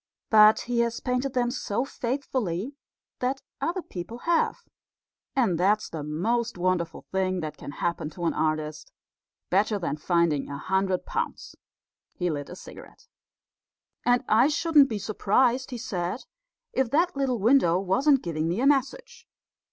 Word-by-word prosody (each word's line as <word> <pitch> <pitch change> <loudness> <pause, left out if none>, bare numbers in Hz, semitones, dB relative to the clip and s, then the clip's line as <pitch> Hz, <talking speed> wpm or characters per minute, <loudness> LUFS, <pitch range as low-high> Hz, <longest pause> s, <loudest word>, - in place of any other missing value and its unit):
But 215 0 +7
he 240 0 -2
has 235 0 0
painted 250 +1 -2
them 245 -1 +1
so 240 0 -2
faithfully 250 -5 -3 0.5
that 260 +2 -2 0.2
other 345 +2 -1
people 185 +6 -7
have; 340 -1 +1 0.7
and 215 -11 +2
that's 205 +4 +2
the 160 - -5
most 220 +10 -1
wonderful 175 -2 -1
thing 185 -1 0
that 155 -1 -5
can - - -9
happen 170 -2 -2
to 170 +2 -6
an - - +1
artist 155 -1 -2 0.6
better 205 +3 +2
than 160 -6 -3
finding 165 -3 +1
a 140 - -5
hundred 190 +3 0
pounds." - - -4 0.6
He 180 -1 -1
lit 145 -2 -5
a - - -8
cigarette. - - -13 0.9
"And 245 +1 +3
I 230 +5 +5
shouldn't 300 -2 +4
be 220 - -2
surprised," 235 +5 +1
he 250 - -5
said, 195 -2 -3 0.5
"if 260 -2 +1
that 335 +6 +2
little 270 -3 0
window 210 -6 +4
wasn't 265 +9 +2
giving 160 -2 -2
me 175 +6 -1
a 260 - +1
message. 465 - 0
215 Hz, 150 wpm, -26 LUFS, 175-260 Hz, 0.9 s, But